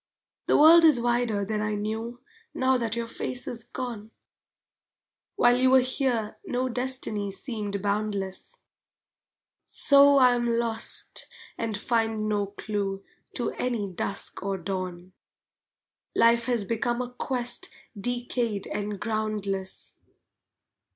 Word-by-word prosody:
The - - +4
world 330 +3 +8
is 305 -6 +6
wider 235 -4 +1
than 210 +1 -2
I 215 0 -1
knew 220 +3 -4 0.3
Now 260 0 +3
that 230 -3 -1
your 235 0 -2
face 245 +2 -3
is 230 -1 -4
gone! 235 -3 -6 1.3
While 245 0 +5
you 255 +1 +4
were 260 0 +6
here 250 -4 -1
no 255 +1 -1
destiny 245 -5 -1
seemed 205 -2 -4
boundless. 205 - -2 1.1
So 280 0 +5
I 250 -2 +6
am 240 -1 0
lost 230 -1 -2 0.3
and 220 -3 -2
find 225 -1 0
no 205 -1 0
clue 200 -1 -4 0.3
To 240 - -1
any 230 -6 -2
dusk 195 +3 -4
or 195 0 -2
dawn! 185 0 -5 1.0
Life 235 0 +4
has 235 -4 0
become 240 +3 -1
a 245 - -8
quest 245 -1 -1 0.3
decayed 240 -1 -1
and 205 -1 -4
groundless. 210 -3 -3
225 Hz, 120 wpm, -27 LUFS, 205-245 Hz, 1.3 s, world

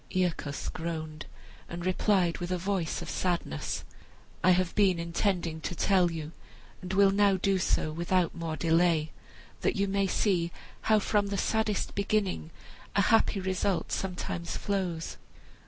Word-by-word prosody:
Aeacus 175 -6 -1
groaned, 160 -2 -5 0.4
and 170 0 -5
replied 185 -2 +2
with 175 - -4
a 185 - 0
voice 185 -2 -2
of - - -7
sadness, 170 - -2 0.6
"I 185 - +5
have 180 -1 +3
been 195 -4 +4
intending 170 -1 -1
to 180 - -4
tell 185 0 +3
you, 160 -2 -5 0.5
and 185 0 -5
will 195 0 +5
now 200 -1 +4
do 195 +1 +1
so, 155 -3 +1
without 170 +2 +1
more 165 -2 -4
delay, 165 0 +2 0.5
that - - 0
you 200 0 +1
may 195 0 +1
see 180 -4 +1 0.4
how 215 - +6
from 205 0 +1
the 200 0 -2
saddest 220 0 0
beginning 200 -4 0 0.5
a 200 - +5
happy 225 -2 +4
result 190 0 -1
sometimes 180 -2 -3
flows. 185 -5 -2
180 Hz, 145 wpm, -29 LUFS, 170-195 Hz, 0.6 s, how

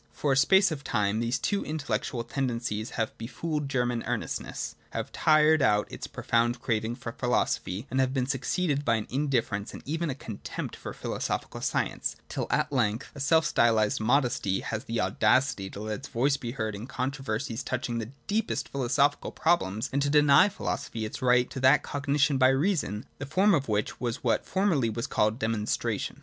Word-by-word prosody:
For 145 - -1
a - - +4
space 190 +7 +5
of 145 -2 -4
time 105 -2 0
these 120 +2 0
two 200 +10 -1
intellectual 125 -6 -2
ten 130 +3 -2
dencies 115 -2 -3
have 110 -2 -2
befooled 150 +5 -3
German 125 -3 0
earnestness, - - -3 0.2
have - - -4
tired 155 0 +4
out 105 -4 +3
its - - -6
profound 120 +1 0
craving 115 0 -1
for 115 - -6
philosophy, 120 -4 -1
and 130 - 0
have 130 -1 +2
been 130 -2 0
succeeded 145 +3 0
by 115 -4 +2
an 110 - -2
indifference 125 -7 -1
and - - -10
even 160 +3 -2
a 130 - -2
contempt 110 -6 -6
for - - -7
philosophic - - -4
science, - - -1
till - - -3
at - - +1
length 120 -1 0
a 140 - -10
self 160 +4 +3
styled 110 -3 +3
modesty 120 -5 +1
has 110 0 -4
the 115 0 -2
audacity 100 +3 +2
to 100 - -9
let 110 +1 -3
its 135 - -9
voice 135 +3 +1
be 120 -4 -5
heard 110 -5 -2
in 105 +4 -7
controver 130 -3 -2
sies 120 -2 -4
touching 120 -2 -2
the 110 0 -5 0.2
deepest 215 +2 -1
philosophical 140 +2 +1
problems, 115 - +1
and 140 - +1
to 140 - +1
deny 150 +6 +6
philosophy 115 - -4
its 110 - -6
right 125 0 +4
to 135 - -5
that 135 +2 +5
cognition 140 0 +1
by 130 0 +6
reason, 135 - 0
the 145 - -4
form 195 +7 +4
of 140 -7 +1
which 105 0 -1
was 120 -2 -3
what - - +1
formerly 180 - +2
was 115 +2 -3
called 105 +1 +1
demonstration! 110 -3 -2
130 Hz, 185 wpm, -28 LUFS, 115-145 Hz, 0.2 s, deny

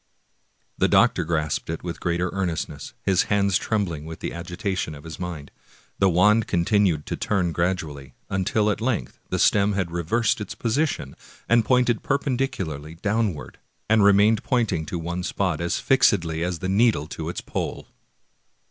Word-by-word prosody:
The - - +4
doctor - - +4
grasped 80 -3 -1
it 80 - -4
with 85 -2 -5
greater 85 0 -1
earnestness, 85 -6 -3
his 95 -3 +2
hands 100 -2 +2
trembling 95 -9 -2
with 80 0 -8
the - - -4
agitation 90 -1 -3
of 70 - -12
his 80 -1 -9
mind. 85 -5 -6 0.5
The 95 - +4
wand 105 +5 +4
continued 90 -3 +2
to - - -3
turn 90 -5 0
gradually, 80 -7 -3
until 105 +3 +1
at 105 - -4
length 115 - -2
the - - -1
stem 100 0 +3
had 95 -4 -1
reversed 100 +7 0
its 105 - -6
position, 115 - -1 0.3
and 115 -1 +4
pointed 125 -2 +2
perpendicularly 120 - -2
down 105 +1 0
ward, - - -10 0.3
and 110 -1 +4
remained 100 +2 +5
pointing 105 - 0
to 90 - -3
one 85 +2 -3
spot 90 -3 -1
as 85 - 0
fixedly 85 -11 +2
as 90 0 -2
the 95 - -4
needle 100 -5 +3
to - - -5
the - - -6
pole. - - -4
95 Hz, 160 wpm, -24 LUFS, 85-105 Hz, 0.5 s, remained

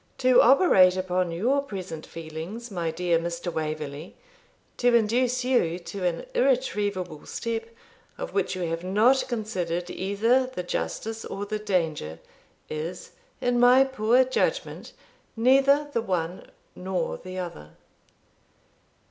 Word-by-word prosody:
To 255 -1 +5
operate 210 - +6
upon 185 -1 0
your 245 +12 +1
present 185 - -7
feelings, 165 +9 -7
my 170 -4 -2
dear 170 0 +1
Mr. 170 +1 -4
Waverley, 155 0 -5 0.6
to 245 -1 +3
induce 245 +3 +2
you 175 -10 +2
to 185 +2 -7
an 175 -2 -1
irretrievable 205 - 0
step, 230 -1 -4 0.5
of - - -6
which 405 - 0
you 185 - -3
have 165 0 -3
not 220 +8 +3
considered 180 -7 -3
either 225 +7 +1
the 255 -8 -5
justice 225 +5 -4
or 200 +1 -5
the 215 +1 -3
danger, 165 - -1 0.5
is, 160 +4 -6 0.3
in 245 -1 +1
my 250 +2 +7
poor 255 -1 +3
judgment, 480 - -2 0.4
neither 275 +5 +4
the 230 - +1
one 180 -4 -3 0.3
nor 185 0 -3
the 185 +1 -8
other.' 165 - -7
195 Hz, 125 wpm, -26 LUFS, 175-245 Hz, 0.6 s, my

